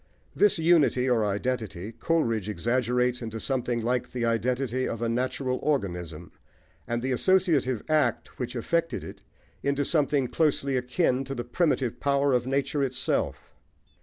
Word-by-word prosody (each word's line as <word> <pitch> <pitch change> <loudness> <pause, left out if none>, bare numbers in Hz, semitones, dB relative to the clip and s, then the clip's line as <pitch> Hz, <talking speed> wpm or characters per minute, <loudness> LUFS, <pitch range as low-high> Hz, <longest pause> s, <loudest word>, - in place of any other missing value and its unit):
This 205 -2 +4
unity 160 -6 +3
or 120 -4 +3
identity 105 -2 -2
Coleridge 115 - 0
exaggerates 125 +2 0
into 115 -1 -5
something 120 -2 -1
like 125 +1 0
the 120 -2 -2
identity 125 +2 0
of 115 - -4
a 120 - -1
natural 130 +2 -1
organism, 90 - -2 0.6
and 120 0 -2
the 130 - -1
associative 145 - +2
act 155 -1 0
which 125 0 -4
effected 165 +8 -1
it - - -10 0.4
into 140 0 0
something 145 -4 +2
closely 140 -2 +1
akin 125 +1 +1
to 135 +1 -5
the 120 - -3
primitive 130 -2 0
power 140 -1 +2
of 125 0 +1
nature 140 +2 0
itself. 130 -2 -2
125 Hz, 140 wpm, -27 LUFS, 120-140 Hz, 0.6 s, This